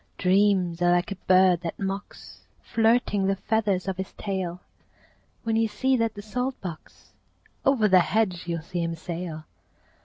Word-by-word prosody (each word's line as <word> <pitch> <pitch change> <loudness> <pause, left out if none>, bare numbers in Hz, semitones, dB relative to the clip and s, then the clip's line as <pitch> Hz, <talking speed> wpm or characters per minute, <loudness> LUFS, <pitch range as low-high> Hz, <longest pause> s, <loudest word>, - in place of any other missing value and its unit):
Dreams 185 -2 +2
are 175 0 +4
like 175 +2 0
a - - -2
bird 185 -2 +5
that 170 -2 -5
mocks, 195 +1 -6 0.2
Flirting 225 -3 +2
the 195 - +2
feathers 200 -3 0
of 190 -1 -2
his 190 0 -5
tail. 185 -3 -4 0.8
When 225 -1 0
you 225 0 +3
sieze 255 +4 +1
at 230 -1 0
the 205 - -8
salt 250 +5 -3
box, 175 -4 -10 0.5
Over 250 -6 +3
the 185 -2 +6
hedge 180 -2 0
you'll 165 -2 -3
see 175 +1 -4
him 165 0 -2
sail. 165 -1 -6
190 Hz, 160 wpm, -26 LUFS, 175-215 Hz, 0.8 s, the